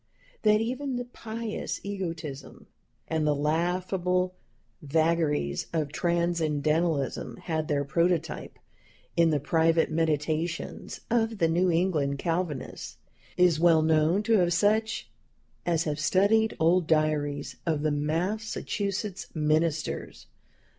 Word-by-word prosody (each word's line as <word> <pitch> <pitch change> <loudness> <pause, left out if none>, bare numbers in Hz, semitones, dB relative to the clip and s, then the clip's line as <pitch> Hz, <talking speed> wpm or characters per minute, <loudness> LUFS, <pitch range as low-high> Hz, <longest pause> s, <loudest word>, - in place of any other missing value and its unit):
" - - -31
That 215 0 +4
even 255 +3 -2
the 245 0 -3
pious 230 -2 -5
egotism 165 -8 -6 0.4
and 160 -1 0
the 150 - +3
laughable 180 +4 0 0.5
vagaries 155 - 0
of 155 -3 -1
Transcendentalism 160 -6 0
had 160 -2 -2
their 145 -1 0
prototype 170 +2 -1 0.6
in 170 -1 +4
the 150 -2 +1
private 160 +3 +2
meditations 160 +1 -2
of 225 -1 +1
the 165 - +3
New 175 +3 +2
England 165 -5 +1
Calvinists, 165 -2 -3 0.4
is 180 -3 +4
well 165 -2 +5
known 160 +5 +3
to 210 -6 +3
such 215 +5 +1 0.6
as 165 -1 +2
have 150 -2 -2
studied 200 +8 +3
old 165 +1 +3
diaries 150 -2 0
of 155 -3 0
the 155 - +2
Massachusetts 195 +5 -2
ministers. 155 0 -1
165 Hz, 110 wpm, -27 LUFS, 155-185 Hz, 0.6 s, well